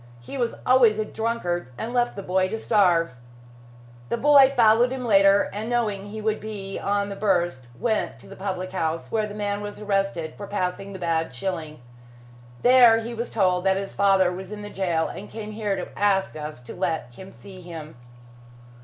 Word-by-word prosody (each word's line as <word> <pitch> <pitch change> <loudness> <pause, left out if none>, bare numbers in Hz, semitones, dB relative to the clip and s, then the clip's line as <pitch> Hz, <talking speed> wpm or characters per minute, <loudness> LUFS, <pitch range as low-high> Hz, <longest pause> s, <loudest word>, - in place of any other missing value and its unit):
He 120 - -10
was 240 -3 -1
always 245 -4 +5
a 215 - -1
drunkard, 215 - -2
and 230 - -4
left 245 -1 +1
the 200 - -6
boy 185 0 +1
to 225 - -3
starve. 175 - +2 0.9
The - - 0
boy 280 0 +7
followed 230 +2 +5
him 260 -1 -4
later, 195 -2 +5
and 215 +3 -4
knowing 210 -5 -1
he 215 +1 -7
would 215 0 0
be 200 -2 -6
on 200 0 0
the 200 - -5
burst, 175 - 0
went 220 -3 -1
to - - -16
the 195 - -11
public 185 -1 -4
house, 165 -3 -2
where 215 -1 0
the 205 - -8
man 205 -1 -2
was 205 0 -7
arrested 195 -6 -1
for 200 - -8
passing 195 0 -3
the - - -6
bad 165 -5 -1
shilling. 155 -1 -4 0.8
There, 245 -2 +7
he 235 +1 -6
was 235 +1 -4
told 185 -4 +1
that 190 0 +3
his 195 0 -5
father 195 -2 +3
was 185 +2 -7
in 210 -1 -7
jail, 170 -4 0
and 205 - -8
came 215 -1 -7
here 210 -2 -2
to 185 - -5
ask 200 -1 +1
us 150 -3 -6
to 125 - -10
let 160 -9 -2
him 190 +9 -11
see 190 -2 -13
him." 165 -3 -9
200 Hz, 190 wpm, -24 LUFS, 180-220 Hz, 0.9 s, boy